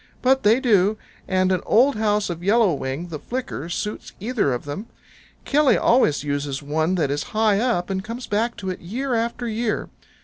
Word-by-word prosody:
But 265 Hz, +1 st, +4 dB
they 220 Hz, +4 st, +4 dB
do, 210 Hz, -5 st, +3 dB, 0.3 s
and 185 Hz, 0 st, +2 dB
an 185 Hz, -1 st, +1 dB
old 265 Hz, +5 st, +4 dB
house 210 Hz, -3 st, +1 dB
of 170 Hz, -1 st, -6 dB
Yellow 210 Hz, -1 st, +4 dB
Wing 140 Hz, +5 st, -4 dB
the 155 Hz, -3 st, -5 dB
Flicker 240 Hz, -, -5 dB
suits 210 Hz, +4 st, -4 dB
either 215 Hz, -, 0 dB
of 125 Hz, +2 st, -3 dB
them. 170 Hz, +10 st, -6 dB, 0.6 s
Killy 295 Hz, -1 st, +4 dB
always 195 Hz, -, +3 dB
uses 145 Hz, -1 st, -3 dB
one 155 Hz, +5 st, 0 dB
that 150 Hz, -6 st, 0 dB
is 145 Hz, +1 st, -1 dB, 0.2 s
high 215 Hz, -2 st, +3 dB
up, 215 Hz, -7 st, 0 dB
and 190 Hz, 0 st, -2 dB
comes 235 Hz, +4 st, -6 dB
back 225 Hz, +3 st, -1 dB
to 190 Hz, -2 st, -3 dB
it 185 Hz, -, -6 dB
year 250 Hz, +9 st, -3 dB
after 235 Hz, +1 st, -1 dB
year. 225 Hz, 0 st, -2 dB
205 Hz, 190 wpm, -23 LUFS, 170-235 Hz, 0.6 s, But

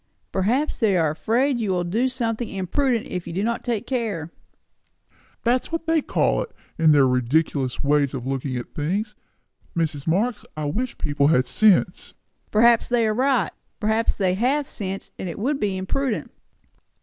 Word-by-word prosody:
"Perhaps 240 Hz, +11 st, 0 dB
they 205 Hz, -5 st, +3 dB
are 160 Hz, -3 st, +2 dB
afraid 240 Hz, -, +1 dB
you 215 Hz, -3 st, -1 dB
will 180 Hz, -2 st, +1 dB
do 225 Hz, +9 st, 0 dB
something 235 Hz, -3 st, -2 dB
imprudent 230 Hz, +6 st, 0 dB
if 180 Hz, -1 st, -5 dB
they -, -, -6 dB
do 190 Hz, +4 st, -1 dB
not 235 Hz, +1 st, -1 dB
take 230 Hz, -4 st, -2 dB
care." 210 Hz, -11 st, -2 dB, 1.1 s
"That's 245 Hz, +5 st, +1 dB
what 330 Hz, 0 st, -2 dB
they 325 Hz, -1 st, +2 dB
call -, -, +1 dB
it, -, -, -5 dB, 0.3 s
with 160 Hz, -1 st, +6 dB
their 145 Hz, -3 st, +6 dB
ridiculous 130 Hz, +1 st, 0 dB
ways 145 Hz, -1 st, +2 dB
of 125 Hz, -2 st, -5 dB
looking 135 Hz, 0 st, -2 dB
at 120 Hz, -, -7 dB
things. 200 Hz, +9 st, -2 dB, 0.6 s
Mrs. 155 Hz, -3 st, -1 dB
Marx, 210 Hz, +8 st, +1 dB
I 155 Hz, -, -2 dB
wish 235 Hz, +13 st, -2 dB
people 145 Hz, -1 st, +1 dB
had 130 Hz, -4 st, +3 dB
sense." 210 Hz, +6 st, +2 dB, 0.3 s
"Perhaps 230 Hz, +2 st, +4 dB
they 240 Hz, -2 st, +2 dB
are 215 Hz, -, +1 dB
right. 255 Hz, -, +2 dB, 0.3 s
Perhaps 220 Hz, +2 st, +1 dB
they 185 Hz, -3 st, +1 dB
have 265 Hz, +8 st, +1 dB
sense, 195 Hz, -1 st, -5 dB
and 185 Hz, -, -4 dB
it 165 Hz, -, -6 dB
would 275 Hz, +7 st, -1 dB
be 200 Hz, -3 st, -1 dB
imprudent." 225 Hz, +6 st, -2 dB
205 Hz, 170 wpm, -23 LUFS, 160-240 Hz, 1.1 s, with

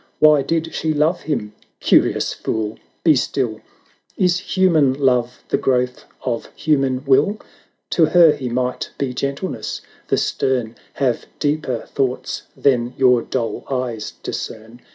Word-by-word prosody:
Why 150 Hz, -2 st, +6 dB
did 165 Hz, +2 st, -1 dB
she 160 Hz, -1 st, 0 dB
love 160 Hz, +4 st, +2 dB
him? 115 Hz, -9 st, -3 dB, 0.3 s
Curious -, -, +3 dB
fool! 110 Hz, -1 st, -3 dB
— -, -, -42 dB
'be 155 Hz, -3 st, +6 dB
still 125 Hz, -3 st, -1 dB, 0.3 s
— -, -, -39 dB
Is 180 Hz, -1 st, +2 dB
human 175 Hz, -8 st, +3 dB
love 125 Hz, -3 st, +1 dB
the -, -, +1 dB
growth 125 Hz, -1 st, 0 dB, 0.2 s
of 120 Hz, -3 st, -2 dB
human 135 Hz, -3 st, +1 dB
will? 200 Hz, +10 st, +3 dB, 0.5 s
To 165 Hz, -, +4 dB
her 170 Hz, 0 st, +7 dB
he 130 Hz, -4 st, -4 dB
might 125 Hz, +1 st, -2 dB
be 135 Hz, -3 st, -2 dB
gentleness; 140 Hz, +8 st, -3 dB, 0.3 s
the -, -, +2 dB
stern 120 Hz, -4 st, 0 dB, 0.2 s
Have 130 Hz, -4 st, -1 dB
deeper 145 Hz, -5 st, -1 dB
thoughts 130 Hz, -2 st, -2 dB, 0.2 s
than 125 Hz, -3 st, +1 dB
your 125 Hz, -2 st, +5 dB
dull 115 Hz, -3 st, -3 dB
eyes 125 Hz, -5 st, -3 dB
discern. 110 Hz, +2 st, -6 dB
130 Hz, 140 wpm, -20 LUFS, 125-155 Hz, 0.5 s, her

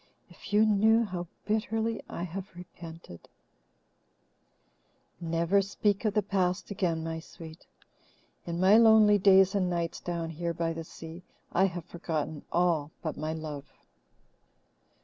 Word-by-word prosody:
If -, -, -12 dB
you 210 Hz, +1 st, +5 dB
knew 220 Hz, +2 st, +4 dB
how 180 Hz, -3 st, -5 dB, 0.2 s
bitterly 220 Hz, +1 st, -1 dB
I 170 Hz, -, -5 dB
have 185 Hz, +1 st, -7 dB
repented 165 Hz, -, -11 dB, 1.0 s
" -, -, -44 dB, 0.6 s
"Never 170 Hz, +4 st, +1 dB
speak 200 Hz, +2 st, -1 dB
of 210 Hz, -1 st, 0 dB
the 210 Hz, -, +2 dB
past 185 Hz, -1 st, -1 dB
again, 170 Hz, -5 st, -1 dB
my 160 Hz, 0 st, -4 dB
sweet. 160 Hz, 0 st, -12 dB, 0.8 s
In 170 Hz, 0 st, -3 dB
my 190 Hz, +4 st, +6 dB
lonely 220 Hz, -2 st, +6 dB
days 190 Hz, 0 st, +5 dB
and 190 Hz, -3 st, +1 dB
nights 170 Hz, -1 st, -2 dB
down 170 Hz, -2 st, -4 dB
here 170 Hz, +1 st, -3 dB
by 165 Hz, -1 st, -1 dB
the 165 Hz, 0 st, -6 dB
sea, 165 Hz, +2 st, -10 dB, 0.3 s
I 190 Hz, -, +3 dB
have 175 Hz, -3 st, -4 dB
forgotten 160 Hz, -3 st, -4 dB
all 170 Hz, -4 st, +1 dB
but 155 Hz, -, -3 dB
my 155 Hz, +1 st, -3 dB
love." 150 Hz, -3 st, -6 dB
175 Hz, 140 wpm, -29 LUFS, 165-200 Hz, 1.0 s, my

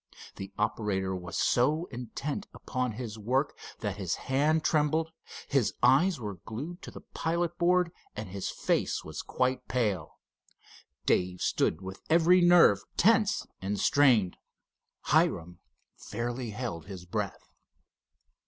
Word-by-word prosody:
The 95 Hz, 0 st, -7 dB
operator 100 Hz, -3 st, -1 dB
was 90 Hz, -2 st, -5 dB
so 150 Hz, +7 st, +2 dB
intent 135 Hz, -, -5 dB
upon 125 Hz, -3 st, -2 dB
his 110 Hz, -1 st, -6 dB
work 130 Hz, +7 st, 0 dB, 0.3 s
that 105 Hz, -2 st, -3 dB
his 95 Hz, -5 st, -1 dB
hand 150 Hz, +4 st, +1 dB
trembled, 155 Hz, +1 st, +1 dB, 0.4 s
his 135 Hz, -6 st, +1 dB
eyes 140 Hz, +7 st, +5 dB
were 105 Hz, -5 st, -6 dB
glued 150 Hz, -, -6 dB
to -, -, -8 dB
the -, -, -10 dB
pilot 170 Hz, +1 st, -1 dB
board, 180 Hz, 0 st, +3 dB, 0.2 s
and 105 Hz, 0 st, -5 dB
his 95 Hz, +1 st, -4 dB
face -, -, 0 dB
was -, -, -6 dB
quite 130 Hz, 0 st, -1 dB
pale. 105 Hz, -10 st, -1 dB, 0.9 s
Dave 90 Hz, 0 st, +1 dB
stood 80 Hz, -, +1 dB
with 95 Hz, 0 st, -8 dB
every 170 Hz, +3 st, +5 dB
nerve 175 Hz, -, +7 dB, 0.2 s
tense 215 Hz, +1 st, +3 dB, 0.2 s
and 100 Hz, +1 st, -2 dB
strained. 120 Hz, -10 st, +4 dB, 0.6 s
Hiram 85 Hz, +1 st, +1 dB, 0.4 s
fairly 120 Hz, +2 st, -4 dB
held 105 Hz, -7 st, -5 dB
his 95 Hz, -3 st, -8 dB
breath. 90 Hz, -, -4 dB
125 Hz, 125 wpm, -29 LUFS, 100-155 Hz, 0.9 s, nerve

